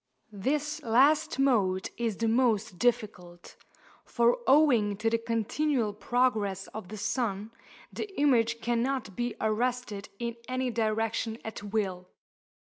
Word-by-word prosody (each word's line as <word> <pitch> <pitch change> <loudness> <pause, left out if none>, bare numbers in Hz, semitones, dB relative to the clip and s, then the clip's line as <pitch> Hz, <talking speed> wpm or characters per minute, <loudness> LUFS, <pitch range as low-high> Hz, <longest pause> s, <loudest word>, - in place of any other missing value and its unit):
This 300 +9 -2
last 270 +6 +3
mode 205 -9 +2
is 230 -3 -2
the 230 - 0
most 225 -5 +1
difficult; 180 -7 -2 0.5
for 235 0 +2
owing 250 -8 +4
to 225 +2 0
the 230 - +2
continual 230 +1 0
progress 215 -4 0
of 215 -4 -8
the 215 +3 -8
sun, 220 -1 -2 0.4
the 425 - -4
image 235 -5 +3
cannot 240 -2 -1
be 240 -1 -2
arrested 220 -1 -1
in 235 0 -4
any 255 0 -1
direction 225 0 -1
at 220 -2 -6
will. 195 -3 -3
230 Hz, 125 wpm, -29 LUFS, 210-250 Hz, 0.5 s, owing